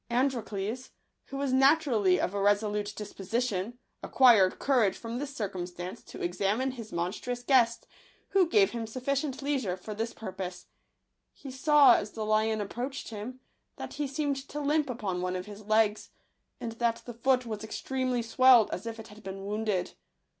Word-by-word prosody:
Androcles, 240 -2 -1 0.4
who 275 - -7
was 275 -2 -1
naturally 260 - +4
of 185 - -1
a 200 - -1
resolute 205 0 +1
disposition, 215 +1 -3 0.2
acquired 225 -8 +5
courage 245 -8 +2
from 230 +1 -5
this 285 0 -5
cir 215 -6 -1
cumstance 180 0 -6
to - - -8
examine 200 +9 0
his 230 -4 -9
monstrous 215 +8 -3
guest, 240 -3 +3 0.4
who 380 -4 +3
gave 395 +1 +4
him 230 -2 -4
sufficient 270 +3 -2
leisure 260 -11 -1
for 210 +4 -7
this 225 +2 -3
pur 220 -5 -7
pose. 180 -1 -6 0.7
He 275 - -10
saw, 275 0 +6
as 210 - -5
the 220 -1 -4
lion 215 0 +1
approached 245 +7 -5
him, 230 +4 -7 0.3
that - - -7
he 290 0 -2
seemed 280 0 -1
to 295 - -5
limp 295 0 +1
upon 200 -7 -3
one 180 0 -2
of 180 0 -4
his 210 0 -11
legs, 215 -1 +2 0.5
and 230 - -4
that 235 -1 +1
the 240 - -7
foot 255 +2 +1
was 215 -2 -5
extremely 255 +2 -2
swelled, 240 -1 +5
as 205 +6 -5
if 225 0 -5
it 220 - -10
had 210 +1 -14
been 195 -1 -7
wounded. 210 -2 -1
230 Hz, 170 wpm, -29 LUFS, 205-260 Hz, 0.7 s, saw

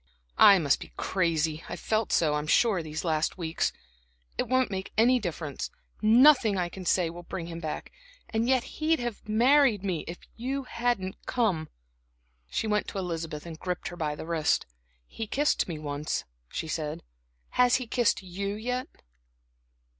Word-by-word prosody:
"I 200 - +9
must 145 -6 +2
be - - -10
crazy; 165 -3 0
I've 175 - -5
felt 220 -1 0
so, 155 -3 +3
I'm 150 0 -2
sure, 200 +1 +3
these 155 0 -5
last 160 -1 0
weeks. 165 -2 -1 0.6
It - - -1
won't 255 -3 +2
make 190 0 -4
any 245 +3 +5
difference 160 - -4 0.3
nothing 230 -1 +6
I 175 -1 -1
say 175 -2 +2
can 175 +1 -9
bring 180 -3 -4
him 165 0 -6
back. 155 -2 -5 0.4
And 230 +2 0
yet 260 -2 +3
he'd 320 +1 0
have 240 -3 -5
married 240 -1 +4
me 185 -5 -1
if 170 - -5 0.2
you 270 +4 -3
hadn't 235 -7 -2
come." 190 -11 0 0.8
She - - -1
went 210 -1 +1
to - - -6
Elizabeth 165 -4 -4
and 165 -2 -8
gripped 180 +1 -3
her 175 - -8
by 155 -3 -2
the - - -7
wrist. 165 -2 +1 0.4
"He 225 - -6
kissed 290 +7 +1
me 165 -3 -4
once," 150 0 -3 0.3
she 160 - -4
said. 155 -1 -3 0.5
"Has 250 -1 +4
he 255 - -1
kissed 235 -3 +1
you 200 +2 -4
yet?" 250 +4 -3
190 Hz, 165 wpm, -28 LUFS, 165-235 Hz, 0.8 s, I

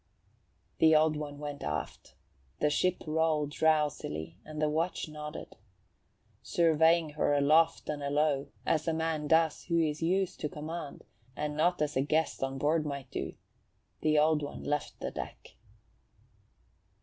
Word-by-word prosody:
The 160 -1 +6
Old 155 0 +4
One 150 -1 -5
went 145 -1 -6
aft. 75 0 -5 0.4
The 150 - +2
ship 180 +4 +1
rolled 155 -2 +1
drowsily 145 - 0
and 155 0 -8
the 155 - +2
watch 165 +4 -1
nodded. 150 0 -8 0.8
Surveying 165 -1 +3
her 145 -1 +1
aloft 155 +3 +3
and 150 -1 -3
alow, 145 0 +1 0.2
as 155 -1 +1
a 165 - +1
man 160 -2 -1
does 160 0 +2
who 170 -1 +1
is 155 -1 0
used 185 +3 0
to 150 - -2
command, 155 0 -6 0.3
and 150 +1 -3
not 170 +1 +2
as 150 0 -2
a 130 - +3
guest 155 +3 0
on 135 0 -2
board 150 +3 +2
might 140 -3 -5
do, - - -4 0.7
the 155 -1 +3
Old 155 0 +4
One 145 - -6
left 150 0 -2
the - - -3
deck. - - -8
150 Hz, 150 wpm, -30 LUFS, 145-160 Hz, 0.8 s, The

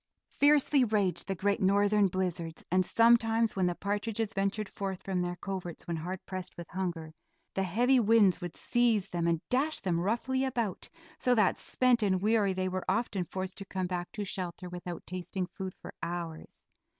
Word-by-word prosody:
Fiercely 290 -1 +4
raged 205 -5 0
the 195 - -1
great 200 +3 0
northern 200 +1 +4
blizzards 175 -3 -3
and 185 +1 +4
sometimes 230 +1 +4
when 185 -2 +2
the 175 - -1
partridges 210 +3 -2
ventured 200 +1 -1
forth 190 -1 -5
from 190 -2 -1
their 175 0 -1
coverts 180 -2 -6
when 170 -1 -2
hard 180 +4 -5
pressed 185 -1 -6
with 170 -1 -7
hunger 170 -4 -4 0.4
the 195 - 0
heavy 240 +8 +3
winds 215 -4 +4
would 175 -2 -5
seize 230 -5 +2
them 170 -1 -1
and 165 -1 0
dash 285 +5 +1
them 175 -4 0
roughly 240 +8 0
about, 235 -7 -2 0.3
so 250 -1 +3
that 210 -5 +4
spent 250 -2 +2
and 190 -3 +2
weary 210 0 +2
they 185 0 -1
were 185 0 -2
often 195 -1 0
forced 185 +2 -5
to 195 - -7
come 185 -1 -3
back 180 -1 -3
to 210 -3 -3
shelter 180 -1 -5
without 175 -1 -7
tasting 185 +1 -3
food 190 -1 -5
for - - -9
hours. 170 -1 -6
190 Hz, 180 wpm, -30 LUFS, 180-220 Hz, 0.4 s, Fiercely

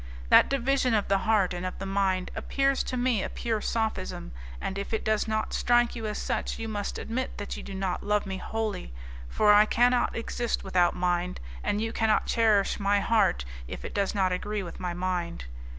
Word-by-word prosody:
That - - +7
division 270 -2 +2
of 210 - 0
the 195 0 +3
heart 200 -5 +3
and 175 0 -4
of 185 - -4
the 195 - -5
mind 195 -1 0
appears 275 0 +1
to 255 - -3
me 245 -4 +1
a - - -3
pure 225 -3 -2
sophism, 220 - -2 0.3
and 190 - -3
if 200 +3 -2
it - - -3
does 215 0 +1
not 220 0 -1
strike 240 0 +3
you 225 -2 -4
as 210 - -3
such - - -2
you 225 - -4
must 205 -2 -3
admit 255 +3 -4
that 205 - -5
you - - -7
do 195 - -8
not 190 -2 -2
love 210 0 0
me 190 -1 -4
wholly, 215 - -3 0.4
for 210 - +4
I 210 +1 +6
cannot 245 +2 +3
exist 235 +1 -2
without 180 -2 +2
mind, 180 0 -1 0.2
and 205 - 0
you 225 0 -2
cannot 220 -1 +2
cherish 215 -4 +2
my 200 0 +2
heart 200 - +2 0.2
if - - -7
it - - -6
does 200 0 0
not 190 -2 +2
agree 205 +2 -2
with 175 - -8
my 180 -1 -3
mind. 175 - -3
205 Hz, 205 wpm, -28 LUFS, 185-225 Hz, 0.4 s, That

